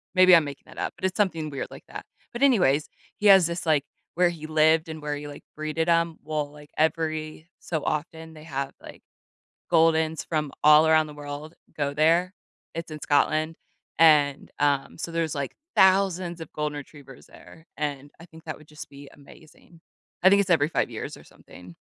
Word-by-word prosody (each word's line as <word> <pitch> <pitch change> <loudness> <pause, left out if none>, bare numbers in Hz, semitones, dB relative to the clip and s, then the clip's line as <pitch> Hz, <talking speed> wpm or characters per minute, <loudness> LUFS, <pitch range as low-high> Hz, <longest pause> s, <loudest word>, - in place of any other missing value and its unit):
Maybe 185 -1 +8
I'm 165 - +5
making 140 -1 -8
that - - -15
up, - - -3
but - - -5
it's 190 - -1
something 165 -7 0
weird 140 -2 -5
like - - -12
that. - - -9 0.3
But 240 - -6
anyways, 175 - +3 0.3
he 210 - +1
has 190 -4 +7
this, 170 +1 -5
like, 155 -4 +2 0.3
where 180 +1 +3
he 160 -3 -8
lived 155 +1 +3
and 160 -1 -7
where 150 0 -3
he, 145 0 -7
like, 145 - -11
breeded 155 +2 -2
'em, 165 -1 +2
well, 150 -2 -3
like 150 0 -15
every 155 0 -1
so 160 -3 -4
often 160 +1 -4
they 155 -1 -13
have, 140 -3 -4
like, - - -12 0.7
goldens 160 -1 +2
from 150 -3 -2
all 150 +1 +7
around 155 -1 +4
the 150 - -10
world 145 +2 -8 0.2
go 145 -1 -1
there, 165 +5 +2 0.4
it's 165 -1 -6
in 155 - -7
Scotland. 155 +3 +1 0.4
And, 150 -3 +4
um, 140 -2 0
so 170 - -5
there's 165 -2 -2
like 140 -2 -4 0.2
thousands 185 -2 +3
of 160 - -9
golden 150 -1 -3
retrievers 140 -2 -12
there, 160 - -16
and 145 -1 -4
I 165 - -12
think 160 -1 -17
that 155 - -6
would 155 - -18
just 150 0 -11
be 140 0 -13
amazing. 160 +3 -18 0.4
I 190 - +8
think 200 +1 +5
it's 195 - -4
every 155 -4 +3
5 - - 0
years - - -7
or - - -15
something. 90 -1 -15
155 Hz, 195 wpm, -25 LUFS, 145-165 Hz, 0.7 s, Maybe